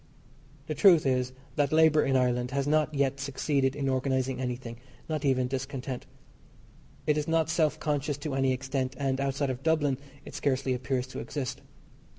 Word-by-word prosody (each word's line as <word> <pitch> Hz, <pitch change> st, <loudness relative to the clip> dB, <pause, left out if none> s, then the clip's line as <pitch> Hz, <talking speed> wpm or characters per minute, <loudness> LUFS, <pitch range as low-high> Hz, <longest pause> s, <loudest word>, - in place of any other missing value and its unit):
The 155 Hz, -, -3 dB
truth 165 Hz, 0 st, +6 dB
is 130 Hz, -1 st, +1 dB, 0.3 s
that 145 Hz, -2 st, +2 dB
labour 155 Hz, -1 st, +5 dB
in 135 Hz, -, +1 dB
Ireland 125 Hz, -1 st, +2 dB
has 140 Hz, +1 st, -1 dB
not 155 Hz, +1 st, +2 dB
yet 140 Hz, -1 st, 0 dB
succeeded 140 Hz, -1 st, 0 dB
in 140 Hz, -2 st, -2 dB
organising 130 Hz, -1 st, 0 dB
anything 125 Hz, -2 st, -4 dB, 0.3 s
not 155 Hz, -2 st, -2 dB
even 130 Hz, -3 st, +2 dB
discontent. 130 Hz, -1 st, -4 dB, 1.0 s
It 150 Hz, 0 st, +2 dB
is 150 Hz, -, -3 dB
not 165 Hz, 0 st, +2 dB
self 160 Hz, -3 st, +1 dB
conscious 145 Hz, -1 st, -1 dB
to 150 Hz, -2 st, -3 dB
any 135 Hz, -1 st, +2 dB
extent, 130 Hz, 0 st, -2 dB
and, 135 Hz, -1 st, 0 dB
outside 140 Hz, 0 st, 0 dB
of 130 Hz, 0 st, -6 dB
Dublin, 150 Hz, -4 st, +1 dB, 0.3 s
it -, -, -10 dB
scarcely 130 Hz, -1 st, 0 dB
appears 125 Hz, 0 st, -1 dB
to 130 Hz, -, -7 dB
exist. 135 Hz, -5 st, -4 dB
135 Hz, 165 wpm, -29 LUFS, 130-150 Hz, 1.0 s, truth